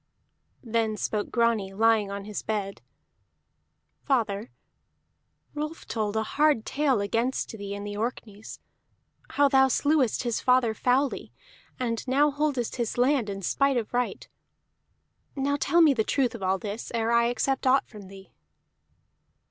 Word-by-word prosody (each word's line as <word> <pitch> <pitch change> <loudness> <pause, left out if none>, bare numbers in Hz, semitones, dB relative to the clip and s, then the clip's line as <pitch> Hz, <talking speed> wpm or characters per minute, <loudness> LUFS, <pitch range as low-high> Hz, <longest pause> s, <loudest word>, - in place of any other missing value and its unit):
Then 225 -2 -1
spoke 210 -1 -2
Grani, 230 -5 +1
lying 220 -1 +3
on 200 0 -6
his 210 -1 -5
bed. 200 -2 -4 1.2
"Father, 225 -5 -1 1.0
Rolf 305 +2 -5
told 215 -2 -2
a 220 - +1
hard 290 -1 +1
tale 275 -6 +1
against 230 +6 -1
thee 200 -2 -6
in 200 - -6
the 205 0 -5
Orkneys: 215 -1 -5 0.7
how 285 0 +4
thou 265 -1 +5
slewest 275 -2 +1
his 240 -2 -1
father 250 -3 +3
foully, 255 +5 0 0.5
and 235 -1 -2
now 285 +3 +3
holdest 285 -5 -1
his 235 -2 -2
land 250 -3 +2
in 195 -1 -6
spite 275 +7 +1
of 230 -1 -3
right. 245 0 -2 1.1
Now 280 +1 0
tell 335 +4 +2
me 310 -4 +6
the 225 -4 0
truth 260 +2 0
of 230 - -8
all 190 0 +1
this, 205 +3 -6
ere 225 0 0
I 235 0 +4
accept 265 +3 0
aught 265 +1 +3
from 210 -4 -12
thee." 195 0 -14
235 Hz, 145 wpm, -26 LUFS, 210-270 Hz, 1.2 s, me